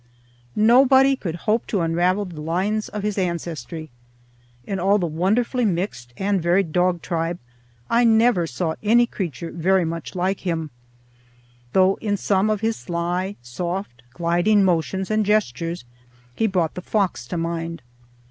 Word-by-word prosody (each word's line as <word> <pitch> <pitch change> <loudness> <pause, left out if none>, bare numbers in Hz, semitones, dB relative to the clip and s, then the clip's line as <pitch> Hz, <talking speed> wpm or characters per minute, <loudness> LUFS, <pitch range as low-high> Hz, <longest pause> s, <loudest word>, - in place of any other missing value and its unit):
Nobody 265 +5 +5
could 170 -10 -4
hope 220 +2 +1
to 200 - 0
unravel 175 +4 +1
the 170 -5 -8
lines 190 +7 -1
of 210 -1 -5
his 210 -1 -1
ancestry. 165 -4 -4 0.7
In 195 -1 -3
all 195 +3 +3
the 180 - -1
wonderfully 210 - 0
mixed 170 - -2
and 195 -1 0
varied 170 0 +2
dog 180 0 +1
tribe 165 0 -2 0.5
I 235 +1 +3
never 225 -6 +4
saw 160 +4 -2
any 235 +3 +4
creature 170 - -5
very 185 +2 +2
much 165 +3 -5
like 185 +2 0
him, 165 -4 -3 1.0
though 190 +1 +4
in 205 -2 0
some 200 +1 +1
of 215 -1 0
his 225 0 0
sly, 175 +3 -2
soft, 170 - -5
gliding 175 - +2
motions 190 +2 0
and 215 0 +2
gestures 170 - 0 0.5
he 225 - +1
brought 180 -5 0
the 180 - -6
fox 190 - -1
to 175 - -4
mind. 165 -1 -3
185 Hz, 145 wpm, -22 LUFS, 165-210 Hz, 1.0 s, Nobody